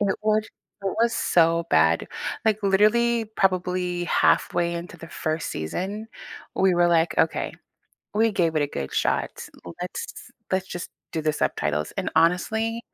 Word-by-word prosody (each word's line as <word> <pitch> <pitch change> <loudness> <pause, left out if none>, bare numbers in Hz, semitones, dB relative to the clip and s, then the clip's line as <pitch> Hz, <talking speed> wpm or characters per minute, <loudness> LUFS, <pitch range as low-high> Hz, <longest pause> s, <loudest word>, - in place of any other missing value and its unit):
it 200 -2 +1
was 215 0 +2 0.4
it 195 - -1
was 235 0 +3
so 165 0 +3
bad. 80 +1 +3 0.4
Like, 215 -1 +2
literally, 225 +4 +3
probably 180 -3 0
halfway 170 0 +2
into 175 +1 -6
the 165 0 -11
1st 155 0 -3
season, 190 - -4 0.5
we 190 -1 +4
were 175 0 +4
like, 170 -1 +2
"Okay. 160 0 +1 0.6
We 225 +1 +3
gave 165 -5 +1
it 150 - +3
a - - +1
good 70 - -5
shot. - - -1 0.4
Let's - - -6 0.2
let's 190 0 +1
just 175 0 -5 0.2
do 160 - -1
the 155 - +1
subtitles." 75 - -1
And, - - -1
honestly 220 +8 +2
180 Hz, 150 wpm, -25 LUFS, 165-210 Hz, 0.6 s, we